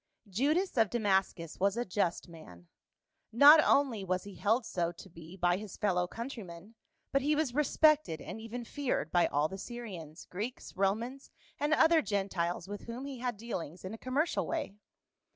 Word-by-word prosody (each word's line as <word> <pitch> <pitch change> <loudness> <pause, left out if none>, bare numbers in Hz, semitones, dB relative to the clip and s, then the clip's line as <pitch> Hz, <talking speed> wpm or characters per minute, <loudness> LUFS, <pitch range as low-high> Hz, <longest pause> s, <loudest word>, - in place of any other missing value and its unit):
JUDAS 290 - 0
of 220 -3 +4
Damascus 195 -7 0
was 200 +3 +2
a 240 - -1
just 185 -2 -1
man; 90 - -13 0.6
not 290 +6 +9
only 260 -8 +2
was 185 -1 -1
he 200 - -10
held 225 +5 +1
so 170 -3 -1
to 175 +2 -13
be 165 +3 -12
by 175 0 +2
his 205 -2 -8
fellow 180 -4 +1
countrymen, 215 -5 -8 0.4
but 275 - +2
he 295 +3 +2
was 300 -5 0
respected 300 - +3
aud - - -7
even 230 +2 -6
feared 255 - -2
by 175 -1 +4
all 145 +2 +1
the 195 +3 -8
Syrians, 185 -11 -8
Greeks, 215 +7 -6
Romans 225 +8 -1 0.3
and 295 +1 0
other 320 +1 +5
Gentiles 190 - -2
with 205 0 -7
whom 240 +3 -6
he 275 -3 -7
had 245 -3 -2
dealings 185 -7 -6
in 190 - -5
a - - -6
commercial 280 +6 0
way. 325 -11 -3
210 Hz, 170 wpm, -32 LUFS, 180-255 Hz, 0.6 s, not